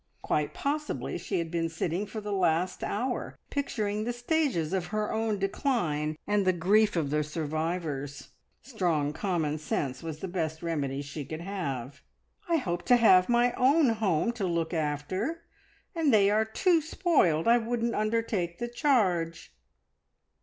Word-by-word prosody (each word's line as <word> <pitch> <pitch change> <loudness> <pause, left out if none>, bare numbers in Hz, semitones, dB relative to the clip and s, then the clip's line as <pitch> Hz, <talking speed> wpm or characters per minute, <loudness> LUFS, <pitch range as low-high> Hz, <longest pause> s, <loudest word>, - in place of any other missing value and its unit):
Quite 150 -1 -1
possibly 300 +2 -2
she 195 - -2
had 165 -2 -2
been 165 -1 0
sitting 170 +4 -2
for 215 +1 -6
the 210 0 -5
last 180 -1 +1
hour 245 +4 -2
picturing 215 -7 -1
the 240 +2 -2
stages 240 - 0
of 185 -2 -1
her 215 +2 -2
own 220 -1 0
decline 175 - -1
and 205 -1 +2
the 185 -1 +3
grief 205 +5 +3
of 150 -5 0
the 150 0 +1
survivors. 155 -2 -3 0.3
Strong 170 - 0
common 160 -5 -1
sense 135 -3 -2
was 160 -2 -5
the 190 - -5
best 160 -3 -3
remedy 145 -4 -2
she 140 +1 -6
could 155 +4 -6
have. 140 -9 -4 0.5
"I 335 - +3
hope 175 - -2
to 245 - +6
have 190 -5 +6
my 240 +1 +3
own 275 +2 +4
home 215 -2 +1
to 220 -6 -3
look 170 -1 -1
after. 170 - -2 0.5
And 325 -5 +2
they 205 -3 +5
are 215 +1 +3
too 330 - +2
spoiled. 290 - +2
I 235 +1 +6
wouldn't 235 0 -1
undertake 215 -5 -1
the 240 +3 -3
charge." 185 - +1
185 Hz, 155 wpm, -29 LUFS, 160-230 Hz, 0.5 s, to